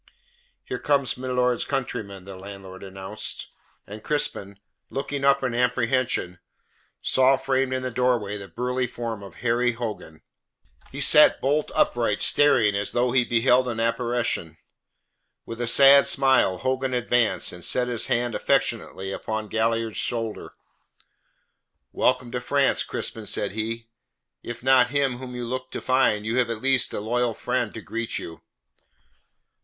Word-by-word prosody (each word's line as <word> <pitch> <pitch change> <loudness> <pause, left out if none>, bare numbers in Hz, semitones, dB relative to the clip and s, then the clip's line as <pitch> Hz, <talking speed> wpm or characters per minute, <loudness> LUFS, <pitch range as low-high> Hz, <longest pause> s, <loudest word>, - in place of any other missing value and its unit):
"Here - - -5
comes 140 -4 +1
milord's 125 -1 0
countryman," 105 -8 -5
the 95 -1 -9
landlord 95 -1 -11
announced. 95 0 -6 0.4
And 105 +1 -10
Crispin, 100 -9 -2 0.3
looking 140 0 -4
up 140 0 +3
in 125 -3 -1
apprehension, 125 -6 0 0.6
saw 130 +1 +4
framed 135 0 -1
in 130 0 -2
the 130 - -3
doorway 120 -4 0
the 100 -1 -8
burly 125 +6 -2
form 115 -3 -6
of 100 -4 -12
Harry 120 +1 +2
Hogan. 105 -9 -7 0.7
He 140 - -6
sat 150 +2 +7
bolt 145 +3 0
upright, 115 -4 +1
staring 125 -8 +4
as 100 0 -1
though 120 0 +1
he 125 0 +3
beheld 125 +2 +2
an 115 -2 -3
apparition. 115 -8 -1 0.9
With 115 +1 -7
a 120 - -1
sad 140 +3 +7
smile, 130 -9 +3
Hogan 130 +1 -2
advanced, 120 -1 +1
and 90 -1 -8
set 125 +7 +2
his 120 -3 0
hand 120 0 0
affectionately 95 -2 -1
upon 110 +1 -4
Galliard's 115 0 -1
shoulder. 115 -3 -2 1.4
"Welcome 125 -1 0
to 125 - -3
France, 140 +2 +2
Crispin," 110 -2 -4
said 100 - -1
he. 115 +2 -4 0.6
"If 120 0 -8
not 130 -1 +4
him 135 -3 0
whom 125 -1 -8
you 120 -1 -5
looked 130 +2 -5
to - - -3
find, 130 -5 +1
you 115 +3 -1
have 125 -2 +1
at 115 -2 -4
least 135 +1 +2
a - - -4
loyal 120 +2 -1
friend 125 -3 -2
to 110 - -7
greet 115 +1 -4
you." 80 -2 -8
120 Hz, 150 wpm, -24 LUFS, 110-130 Hz, 1.4 s, sat